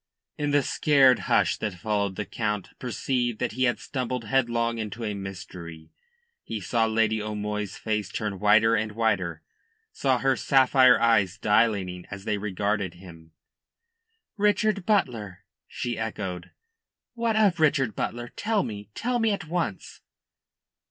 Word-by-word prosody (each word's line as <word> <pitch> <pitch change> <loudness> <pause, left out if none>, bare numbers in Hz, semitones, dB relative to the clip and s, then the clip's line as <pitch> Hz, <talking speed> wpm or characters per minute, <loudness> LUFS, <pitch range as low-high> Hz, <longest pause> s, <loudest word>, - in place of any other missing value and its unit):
In 145 0 -2
the 145 -1 +3
scared 135 -4 +4
hush - - +3
that 105 -4 -3
followed 100 +1 -1
the 105 - -3
Count 105 -3 -3
perceived 120 -1 -1
that - - -2
he 130 +4 0
had 120 - +1
stumbled 125 -2 -4
headlong 115 -1 0
into 110 +1 -5
a 105 -2 -2
mystery. 90 -4 -8 0.5
He 110 - -5
saw 115 +3 +1
Lady 110 -1 +1
O'Moy's 105 -1 -4
face 105 -3 -2
turn 105 -3 -4
whiter 110 +2 +5
and 110 -1 0
whiter, 95 -8 -1 0.5
saw 130 -2 +1
her 135 +1 +2
sapphire 130 +2 +5
eyes 105 -5 +3
dilating 100 -5 +1
as 100 -1 -8
they 105 -1 -1
regarded 100 -2 -2
him. 85 -3 -14 1.0
"Richard 205 -1 +1
Butler!" 115 - 0 0.2
she 120 -2 -4
echoed. 95 -5 -4 0.6
"What 230 -2 0
of 200 -6 +3
Richard 140 - +2
Butler? 120 +1 -3
Tell 215 0 0
me. 105 -4 -7
Tell 245 +2 -1
me 225 -1 +2
at 200 -6 -3
once." 160 - -4
110 Hz, 140 wpm, -26 LUFS, 100-130 Hz, 1.0 s, whiter